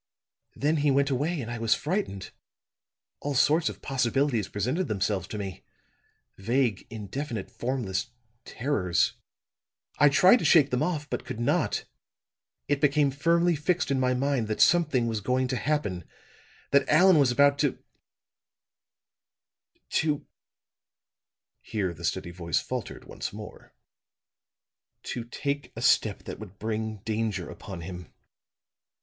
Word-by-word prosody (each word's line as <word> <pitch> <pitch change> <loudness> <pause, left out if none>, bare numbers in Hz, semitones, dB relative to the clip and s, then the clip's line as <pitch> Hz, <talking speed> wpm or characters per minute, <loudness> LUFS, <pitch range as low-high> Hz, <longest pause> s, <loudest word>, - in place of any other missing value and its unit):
"Then 150 +3 +1
he 145 0 +2
went 140 +1 +2
away, 150 +6 0
and 120 -1 -6
I 115 - -4
was 115 -1 +3
frightened. 150 - -3 0.9
All 145 -1 -3
sorts 155 +4 +3
of - - -10
possibilities 135 -3 +1
presented 130 - -1
themselves 100 -2 -1
to 105 - -6
me 95 -3 -6 0.8
vague, 115 0 0
indefinite, 115 +2 -5
formless 120 -6 -2 0.4
terrors. 105 -12 0 0.9
I 145 - +7
tried 185 - +6
to - - -4
shake 150 -5 +5
them 125 - +1
off, 155 -5 -1
but - - -3
could 125 -3 -6
not. 120 - 0 0.8
It 145 -1 0
became 145 -1 +3
firmly 170 +5 +2
fixed 170 +2 0
in 135 - +2
my 125 0 +2
mind 135 -3 0
that 110 - -3
something 155 -8 +4
was 110 -2 -2
going 130 +4 +1
to 130 - 0
happen 105 - -1 0.7
that 140 0 +3
Allan 175 +2 +6
was 135 -3 +4
about 140 +2 +4
to 145 -3 +1 2.1
to 150 -2 0 0.7
" - - -60
here 95 -5 -1
the 80 - -12
steady 85 - -2
voice 85 -3 -1
faltered - - -6
once - - -5
more, - - -10 1.3
"to 120 - -4
take 140 +4 -4
a 115 - -6
step 110 -3 +3
that - - -7
would 100 -3 -10
bring 110 -1 -3
danger 110 -4 -2
upon 95 -4 -8
him. 90 -1 -8
125 Hz, 135 wpm, -27 LUFS, 105-145 Hz, 2.1 s, I